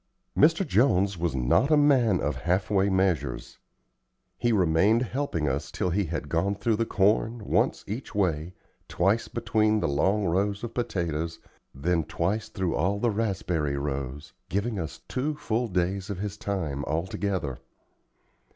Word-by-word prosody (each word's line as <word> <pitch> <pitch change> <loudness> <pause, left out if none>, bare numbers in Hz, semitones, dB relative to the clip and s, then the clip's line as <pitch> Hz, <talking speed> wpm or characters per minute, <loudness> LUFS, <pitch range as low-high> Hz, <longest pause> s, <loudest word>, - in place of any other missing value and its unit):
Mr. 165 +5 +4
Jones 100 -5 +3
was 85 -4 -2
not 65 - +2
a 155 - +5
man 130 -10 +4
of 75 -3 -1
half 90 +10 0
way 100 0 +3
measures. 95 -3 -1 0.8
He 120 0 0
remained 100 +4 +3
helping 125 - -2
us, 70 +4 -2
till 90 - -1
he 100 +3 +1
had 80 -2 -4
gone 85 +6 0
through 110 +1 0
the 115 0 0
corn, 105 +2 +1
once - - +1
each 110 +4 -6
way, 90 -3 0 0.3
twice 100 +6 +1
between 110 -2 +1
the - - 0
long 95 +9 +1
rows 100 +4 0
of 115 -1 -5
potatoes, 85 -8 -2 0.4
then 80 +4 +1
twice 95 +7 -2
through 95 -5 -2
all 95 +6 +1
the 115 +2 +1
raspberry 95 -9 -1
rows, 70 0 -4 0.2
giving 100 +2 -1
us 80 -2 -6
two 145 +4 -2
full 120 -3 -1
days 95 0 -1
of 100 - -3
his 100 +1 -4
time 85 -10 -3
altogether. 85 -2 -2
95 Hz, 150 wpm, -27 LUFS, 80-110 Hz, 0.8 s, a